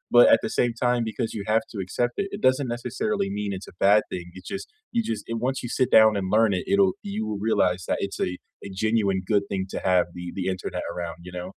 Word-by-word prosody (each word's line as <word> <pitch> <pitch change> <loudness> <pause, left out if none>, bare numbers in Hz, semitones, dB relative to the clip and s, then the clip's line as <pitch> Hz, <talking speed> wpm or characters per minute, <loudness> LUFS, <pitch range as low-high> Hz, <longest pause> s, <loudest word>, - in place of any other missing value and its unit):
but 120 - +9
at - - +6
the - - -1
same 120 -1 +3
time, 120 -1 +2
because 115 0 -3
you 100 - -4
have 110 - +4
to 110 - -8
accept 120 +6 -1
it, 200 - -2
it 205 - -9
doesn't 130 +1 +2
necessarily 195 - -2
mean 105 -1 -2
it's 95 - -7
a - - -12
bad 105 +1 +6
thing, 90 -1 -4
it - - -18
just 195 - -5 0.3
you 235 - +2
just 110 -2 -2
And 115 - -1
once 135 0 -1
you 120 - -4
sit 130 - +3
down 110 0 +7
and 95 -1 -2
learn 110 -2 +4
it, - - -3
it'll 195 -2 +4 0.2
you 210 - -2
will 105 - -3
realize 90 -4 +2
that - - +1
it's 100 - -8
a 90 - -3 0.3
a - - -6
genuine 105 -4 +2
good 100 -1 +4
thing 95 -1 -1
to - - -2
have 90 -1 +4
the 90 - -6
the 95 - -2
internet 90 -1 -5
around, 85 -1 -5
you 90 - -8
know? 90 - -4
110 Hz, 260 wpm, -25 LUFS, 95-125 Hz, 0.3 s, but